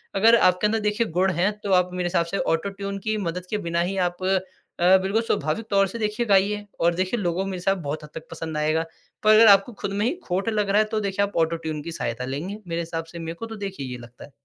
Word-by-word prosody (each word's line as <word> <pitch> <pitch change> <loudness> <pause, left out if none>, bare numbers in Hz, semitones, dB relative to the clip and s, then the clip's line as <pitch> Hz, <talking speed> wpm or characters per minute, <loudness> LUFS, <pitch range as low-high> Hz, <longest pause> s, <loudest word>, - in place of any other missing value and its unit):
अगर 225 +4 +6
आपके 185 -2 +4
अंदर 220 +1 0
देखिए 210 +2 0
गुण 190 +1 +3
हैं, 180 +5 +2
तो 200 - -2
आप 180 0 +4
मेरे 180 -1 -1
हिसाब 170 -1 +1
से 180 +4 -3
ऑटो-ट्यून 200 +4 -2
की 215 +2 -2
मदद 180 -2 -3
के 210 - -1
बिना 170 0 +1
ही 190 +3 -2
आप 175 +1 -13
अ, 190 -1 +1
बिल्कुल 200 +4 +1
स्वाभाविक 160 -1 -1
तौर 195 -1 +3
से 230 +5 -7
देखिए 215 +2 -1
गाइए 205 0 +2
और 170 +1 +3
देखिए 185 +6 -1
लोगों 180 0 -1
मेरे 195 -1 -4
हिसाब 185 +1 0
बहुत 150 +2 -4
हद 150 - -10
तक 160 0 -8
पसंद 160 -1 -5
आएगा। 155 +2 +1 0.4
पर 215 0 +6
अगर 225 +1 +8
आपको 200 +3 +6
खुद 200 - -2
में 205 +2 0
ही 255 - +1
खोट 195 +5 -1
लग 210 -2 0
रहा 200 +2 +4
है, - - +1
तो 215 0 -1
देखिए 200 0 0
आप 200 - -10
ऑटो-ट्यून 160 -2 -1
की 170 - -6
सहायता 120 -6 -3
लेंगे, 150 +10 -4
मेरे 170 0 -2
हिसाब 165 0 -4
से, 170 +1 -10
मेरे 165 0 -5
को 230 - -6
तो 225 -1 -7
देखिए 145 -9 -6
ये 125 - -5
लगता 120 0 -13
है। 145 - -19
190 Hz, 260 wpm, -24 LUFS, 165-205 Hz, 0.4 s, अगर